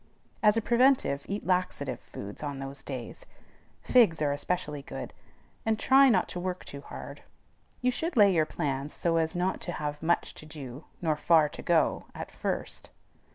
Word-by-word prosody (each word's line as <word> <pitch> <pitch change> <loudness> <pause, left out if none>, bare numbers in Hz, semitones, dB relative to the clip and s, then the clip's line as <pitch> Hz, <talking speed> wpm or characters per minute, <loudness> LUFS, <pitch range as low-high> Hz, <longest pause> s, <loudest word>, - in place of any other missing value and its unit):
As 210 0 +5
a 225 - +1
preventive, 240 - +3
eat 200 +1 -3
laxative 180 -7 0
foods 100 +1 -9
on 145 -2 -4
those 135 0 -7
days, 130 -4 -7 0.6
figs 225 -11 +5
are 150 -2 +1
especially 150 0 -2
good, - - -7 0.5
and 220 -1 +1
try 270 +3 +6
not 190 -7 +3
to 180 - -5
work 180 0 -4
too 140 - -8
hard. - - -9 0.6
You 250 0 +3
should 320 +4 -3
lay 200 -3 +7
your 160 -3 +2
plans 140 0 -3
so 165 -1 +1
as 160 0 0
not 180 +2 0
to 175 - -4
have 150 -1 -4
much 170 +2 +1
to - - -12
do 140 -2 -9 0.2
nor 155 -2 +2
far 160 -1 +5
to - - -9
go 170 -2 +2
at - - -6
first. - - -4
165 Hz, 175 wpm, -29 LUFS, 145-200 Hz, 0.6 s, lay